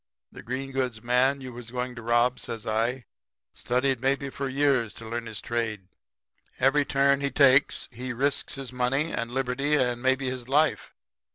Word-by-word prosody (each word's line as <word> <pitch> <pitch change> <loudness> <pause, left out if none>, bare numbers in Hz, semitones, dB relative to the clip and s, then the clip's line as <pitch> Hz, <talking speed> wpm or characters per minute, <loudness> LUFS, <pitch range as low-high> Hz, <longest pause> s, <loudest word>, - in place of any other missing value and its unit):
The - - -10
green 130 +3 -4
goods 125 -4 -2
man 130 +3 +2
you 130 -1 -8
was 120 -1 -9
going 125 +1 -3
to 120 - -9
rob,' 120 +2 +2
says 115 -1 -6
I, 115 +3 -1 0.5
'studied 130 0 0
maybe 135 +1 0
for 135 0 -3
years 135 -5 +1
to 115 - -9
learn 115 0 -4
his 110 -3 -6
trade. 110 -5 -3 0.7
Every 140 +2 +3
turn 140 0 +3
he 140 -1 -1
makes 140 0 +4
he 125 +2 -5
risks 140 +5 -1
his 135 -2 -6
money 135 +5 0
and 115 0 -2
liberty 135 +3 0
and 125 -4 +1
maybe 130 +1 +1
his 130 -1 -5
life. 150 +3 +1
130 Hz, 175 wpm, -27 LUFS, 120-135 Hz, 0.7 s, makes